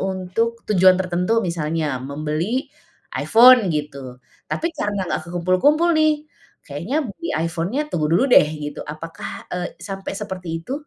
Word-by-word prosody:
untuk 190 +5 -2
tujuan 185 -2 +5
tertentu 180 +5 +1
misalnya 155 -5 -2
membeli 155 - -3 0.5
iPhone 240 -2 +6
gitu. 140 -4 -5 0.3
Tapi 330 - -2
karena 205 -8 -2
enggak 170 - -3
kekumpul-kumpul 185 - +2
nih, 310 -1 +2 0.4
kayaknya 170 - -4
beli 335 +11 -7
iPhone-nya 170 - -2
tunggu 155 -3 0
dulu 185 - +4
deh - - +8 0.2
gitu. 145 0 -6
Apakah 155 +2 -8
e - - -2 0.2
sampai 195 -1 -6
seperti 185 -2 -6 0.2
itu? 255 - -6
185 Hz, 135 wpm, -21 LUFS, 160-230 Hz, 0.5 s, deh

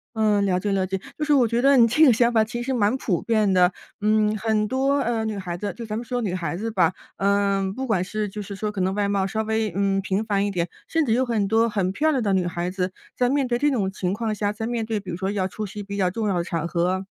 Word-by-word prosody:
嗯， 210 -2 +2
了 180 -1 +2
解 205 +1 -2
了 190 -1 +1
解， 190 0 -2 0.2
就 - - 0
是 300 - 0
我 245 -4 +4
觉 235 +2 0
得 275 0 +5
你 230 -1 +7
这 305 +8 +3
个 265 - +8
想 235 +1 +3
法 220 -1 +4
其 240 +2 -4
实 265 +1 -2
蛮 225 +2 +2
普 185 -9 -1
遍 215 -4 +2
的， 180 0 +5 0.3
嗯， 215 0 +2
很 215 -1 0
多， 270 +3 +1
呃， 230 -2 0
女 215 -2 -3
孩 180 -3 -4
子， 205 +3 -3
就 230 - -6
咱 215 0 -4
们 235 - -3
说 245 +1 -3
女 195 -5 -2
孩 170 -2 -3
子 225 +2 -3
吧， 180 -3 +2 0.2
呃， 200 -1 +1
不 265 +1 -3
管 195 -7 +1
是 210 +2 -3
就 210 +1 -6
是 200 0 -7
说 210 +1 -3
可 195 -3 -3
能 190 +2 0
外 205 -1 +1
貌 195 -1 0
稍 220 +2 -2
微， 220 -2 -1
嗯， 195 -1 +1
平 200 +3 -1
凡 200 -1 +1
一 - - -1
点， 175 -3 -1 0.2
甚 325 -2 +1
至 225 - +1
有 255 +2 +2
很 215 -4 0
多 225 +2 +3
很 195 -4 0
漂 310 +10 +1
亮 265 -6 +1
的 200 -2 +1
女 180 -2 +1
孩 175 +1 -3
子 185 -1 -2 0.2
在 245 0 +2
面 275 -2 +1
对 240 0 0
这 295 +1 +3
种 200 -8 0
情 185 -2 -2
况 220 -1 -2
下， 205 0 -1
在 220 +1 -5
面 235 -1 -2
对 220 -1 -2
比 190 -3 -8
如 - - -3
说 190 +2 -2
要 195 -2 -1
出 215 +3 -5
席 205 +2 -7
比 200 0 -6
较 185 -3 +1
重 215 +2 -2
要 195 - +1
的 - - -1
场 170 -2 -3
合， 185 +2 0
210 Hz, 315 characters per minute, -24 LUFS, 190-230 Hz, 0.3 s, 个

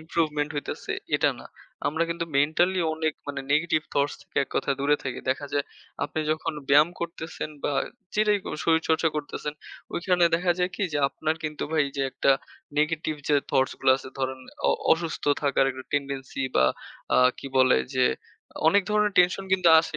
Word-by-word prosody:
Improvement 155 -2 -1
হইতেছে 145 - -5 0.3
এটা - - +3
না। - - -11 0.4
আমরা 160 +3 0
কিন্তু 170 0 -2
মেন্টালি 175 +6 +3
অনেক 160 -1 0 0.2
মানে 140 -1 -3
নেগেটিভ 155 +1 +2
থটস 145 +1 +1
থেকে - - -30
এক - - -31
কথা - - 0
দূরে 145 +1 +3
থাকি। 130 -2 -4
দেখা 135 +2 -2
যায় 145 -1 +1 0.4
আপনি 150 +2 -3
যখন 160 +1 -1 0.2
ব্যায়াম 150 +3 +6
করতেছেন 165 -2 -5
বা - - +1 0.4
যেটাই 210 -1 +3
করে - - -4
শরীরচর্চা 160 0 +3
করতেছেন 150 0 -4 0.4
ওইখানে 180 0 +2
দেখা 175 +1 +2
যায় 180 0 +1
কি - - -3
যে 145 - 0
আপনার 155 +3 -2
কিন্তু 150 -1 -3
ভাই 155 -2 +3
যে 135 - 0
একটা 135 - +2 0.5
নেগেটিভ 155 +1 0
যে 150 - +4 0.2
থাউটসগুলা 130 -1 +3
আছে 130 - -9
ধরেন 130 0 -2 0.3
অ - - +5 0.2
অসুস্থ 165 0 -2 0.2
থাকার 140 -2 +3
একটা 130 0 -8
টেনডেন্সি 140 -1 -2
বা 65 - +5 0.5
অ্যা - - +4 0.2
কি - - -7
বলে 130 0 +5 0.2
যে 130 - +4 0.6
অনেক 200 +3 +4
ধরনের 210 -1 +2
টেনশন 180 +2 +4
কিন্তু 185 -3 +4
আসে 160 -1 -5
155 Hz, 170 wpm, -26 LUFS, 140-170 Hz, 0.6 s, ব্যায়াম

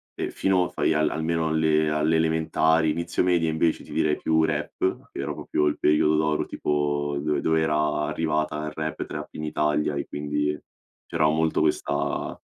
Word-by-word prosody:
e - - -3
fino 95 -2 +2
a - - -3
fai - - 0
al 75 0 +2
almeno 80 0 -1
alle 80 -1 +2
alle 75 +1 +1
elementari, 80 0 +2
inizio 85 +2 -2
medie 85 -3 +2
invece 80 +1 0
ti - - -14
direi 75 -1 +1
più 80 0 +2
rap, 80 +4 -2
che - - -8
era - - -2
proprio 75 - -1
il 75 - 0
periodo 75 +1 +3
d'oro 75 0 +1
tipo 75 -1 -1
do 75 0 0
dove 80 0 +1
era 75 -1 +1
arrivata 75 0 -1
il 75 - -4
rap 80 0 -4
e - - -2
trap - - -6
in 75 - -5
Italia 75 -1 0
e 70 - -3
quindi 75 0 -2 0.5
c'era 80 -2 +1
molto 80 +1 +1
questa 75 -2 -1
75 Hz, 185 wpm, -25 LUFS, 75-80 Hz, 0.5 s, periodo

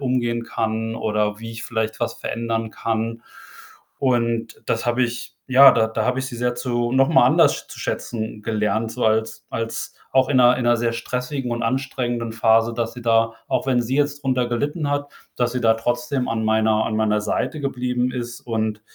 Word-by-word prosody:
umgehen 120 -3 0
kann 110 0 -2
oder 105 -1 -1
wie 115 0 -7
ich 115 +1 -7
vielleicht 110 -2 -2
was - - -2
verändern 115 -1 -3
kann 115 +1 -3 0.8
und 115 -3 0
das 115 +1 -1
habe 120 +1 +2
ich 120 -1 -3
ja, 135 +1 +8
da 110 -1 +3
da 110 -1 -2
habe 125 +1 +1
ich 135 - -3
sie 125 - -7
sehr 125 +1 0
zu 120 -1 -1
noch 135 0 +4
mal - - +5
anders - - +5
sch - - -8
zu - - -11
schätzen 110 -2 -4
gelernt, 110 +1 0
so - - -2
als 110 0 0
als 115 0 -4 0.2
auch 130 -1 +4
in 135 - +4
'ner 125 0 +6
in 125 - -2
'ner 120 0 +4
sehr 115 0 0
stressigen 125 +2 -3
und 120 0 -2
anstrengenden 120 -2 -2
Phase, 115 0 +3
dass 115 0 -2
sie 125 - -9
da 115 -1 +2
auch - - 0
wenn 125 -2 +2
sie 125 +3 -2
jetzt 145 0 0
drunter 130 -2 +1
gelitten 145 +5 -1
hat, 145 0 -2 0.3
dass 120 -1 0
sie 125 - -2
da 115 -1 +4
trotzdem 120 +3 -1
an 110 -1 -1
meiner 110 0 +2
an 110 - -2
meiner 105 -1 +2
Seite 150 +8 -2
geblieben 125 -2 -1
ist 120 -1 -5
und 110 -2 -2
120 Hz, 200 wpm, -22 LUFS, 115-125 Hz, 0.8 s, ja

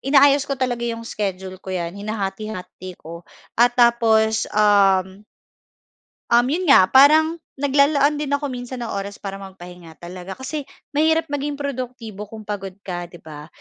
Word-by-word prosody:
inaayos 280 +1 +4
ko 275 - -1
talaga 250 -2 -2
yung 230 0 -5
schedule 190 -3 -5
ko, - - -13
'yan. 175 -2 -3
Hinahati-hati 200 -2 -6
ko 170 +2 -11 0.3
at 240 0 +4
tapos, 225 -2 +3
um 195 -2 +3 1.1
Um, 240 +2 +4
'yon 360 +4 -1
nga, 190 -10 +6
parang 310 +5 +6 0.2
naglalaan 285 +1 +2
din 285 -1 -1
ako 285 -1 -2
minsan 245 0 -6
ng 230 - -4
oras 200 +1 -5
para 195 -1 -7
magpahinga 180 -3 -12
talaga. 180 +2 -8
Kasi 275 +2 -6 0.3
mahirap 320 +2 +2
maging 290 0 -2
produktibo 250 -7 -6
kung 220 -1 -10
pagod 195 -3 -6
ka, 175 -2 -5
'di 175 -1 -15
ba? 150 -1 -10
220 Hz, 150 wpm, -21 LUFS, 190-275 Hz, 1.1 s, nga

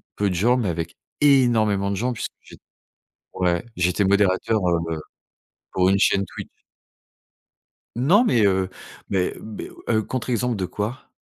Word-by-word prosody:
peu 100 -1 +1
de 90 - -2
gens 120 +8 +3
mais 110 -7 0
avec 85 0 -4 0.2
énormément 110 -8 +3
de - - -1
gens 125 +3 0
puisque - - -5
j'ai - - -15 0.8
ouais, 90 0 0
j'étais 90 +3 +1
modérateur, 100 +2 +2
heu, 85 -2 0 0.7
pour 95 0 +3
une 100 0 +3
chaîne 100 0 +3
Twitch. - - -8 1.5
Non, 175 - +4
mais 115 - +3
heu, 95 -1 +1 0.4
mais 95 -2 0
beh, 110 -1 -8 0.2
heu, 110 -2 +2
contre 130 +3 -4
exemple 120 -1 0
de 95 - -2
quoi? 105 +7 -5
100 Hz, 150 wpm, -23 LUFS, 95-120 Hz, 1.5 s, Non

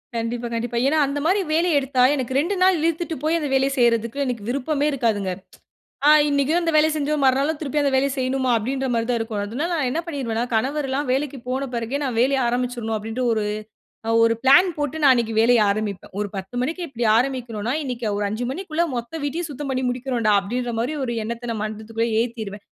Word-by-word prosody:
கண்டிப்பா, 235 +1 -2
கண்டிப்பா. 235 +1 -2
ஏன்னா 305 +3 +2
அந்த 280 +1 -2
மாரி 375 +5 +3
வேலைய 330 -1 +3
எடுத்தா 265 -2 0
எனக்கு 260 -2 -3
2 335 +9 +1
நாள் 375 0 +5
இழுத்துட்டு 330 0 -1
போய் 320 +2 +2
அந்த 300 - -2
வேலைய 270 +1 +2
செய்யிறதுக்கு 235 +1 +2
எனக்கு 245 -5 -3
விருப்பமே 280 +3 0
இருக்காதுங்க. 220 -8 0 0.8
ஆ - - +9 0.2
"இன்னக்கும் 285 +4 +2
அந்த 335 -1 0
வேலைய 310 +1 +5
செஞ்சோம், 300 0 -1
மறுநாளும் 275 +4 +2
திருப்பி 295 -1 -1
அந்த 280 -1 +1
வேலைய 270 +1 +2
செய்யணுமா?" 260 0 0
அப்பிடீன்றமாரி 245 0 -1
தான் 240 - +1
இருக்கும். 225 -2 -3
அதனால 260 - -3
நான் 295 -6 0
என்ன 315 - -1
பண்ணிருவேன்னா, 245 -8 -2
கணவர்லாம் 270 +3 -1
வேலைக்கு 275 +1 -1
போன 265 +2 -2
பிறகு 235 +4 -2
நான் 255 -4 -2
வேலைய 270 +2 +3
ஆரம்பிச்சுர்னும் 240 -2 -1
அப்பிடீன்டு 225 +4 -4
ஒரு, 215 -2 0 0.6
அ - - 0
ஒரு 230 0 +4
பிளான் 350 +8 +6
போட்டு 295 +2 -2
நான் 275 -2 +7
அன்னக்கு 230 -2 -1
வேலைய 235 +1 +5
ஆரம்பிப்பேன். 205 -2 -3
ஒரு 210 - -2
10:00 190 +3 -7
மணிக்கு 325 +7 -3
இப்பிடி 240 -3 -2
ஆரம்பிக்கனுன்னா, 240 -2 -1
இன்னக்கி 245 -4 -4
ஒரு 205 - -1
5:00 225 +4 -3
மணிக்குள்ள 335 +1 -1
மொத்த 235 +2 -5
வீட்டையும் 320 +4 -2
சுத்தம் 280 0 -5
பண்ணி 260 0 -1
முடிக்குறோன்டா 245 -3 0
அப்பிடீன்றமாரி 240 +5 -2
ஒரு 240 -2 -2
எண்ணத்த 235 +2 -5
நான் 215 -2 -4
மனசுக்குள்ளே 220 +2 -3
ஏத்திருவேன். 220 -4 -6
255 Hz, 190 wpm, -22 LUFS, 230-285 Hz, 0.8 s, ஆ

